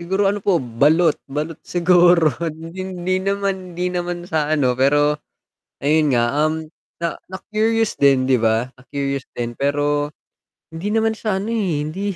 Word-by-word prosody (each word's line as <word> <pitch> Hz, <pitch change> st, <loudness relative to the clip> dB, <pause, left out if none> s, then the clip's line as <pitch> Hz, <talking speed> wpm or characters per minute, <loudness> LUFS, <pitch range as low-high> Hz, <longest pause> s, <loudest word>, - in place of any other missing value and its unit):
Siguro 190 Hz, +4 st, 0 dB
ano 205 Hz, +1 st, +1 dB
po 195 Hz, -2 st, +2 dB
balot, 150 Hz, +6 st, +2 dB
balot 150 Hz, +3 st, -4 dB
siguro 175 Hz, -3 st, +4 dB, 0.2 s
'di 165 Hz, +3 st, -8 dB
hindi 185 Hz, 0 st, -2 dB
naman 195 Hz, -2 st, -2 dB
hindi 180 Hz, 0 st, -1 dB
naman 175 Hz, -1 st, -3 dB
sa 155 Hz, -4 st, -1 dB
ano 145 Hz, -5 st, +2 dB
pero 145 Hz, +3 st, +2 dB, 0.6 s
ayon 150 Hz, +1 st, +2 dB
nga, 120 Hz, -3 st, +3 dB, 0.2 s
um, 155 Hz, +1 st, 0 dB, 0.3 s
na 170 Hz, -1 st, -2 dB, 0.2 s
na-curious 220 Hz, +3 st, 0 dB
din 135 Hz, -2 st, +5 dB
'di 130 Hz, -3 st, +2 dB
ba, 110 Hz, +1 st, +2 dB
na-curious 140 Hz, +1 st, -4 dB
din. 120 Hz, 0 st, -3 dB
Pero 145 Hz, +2 st, 0 dB, 0.6 s
hindi 190 Hz, +7 st, -3 dB
naman 225 Hz, 0 st, +2 dB
sa 220 Hz, -2 st, -2 dB
ano, 225 Hz, -, -3 dB
eh, 185 Hz, -10 st, 0 dB
hindi 190 Hz, +6 st, -3 dB
165 Hz, 155 wpm, -20 LUFS, 145-185 Hz, 0.6 s, din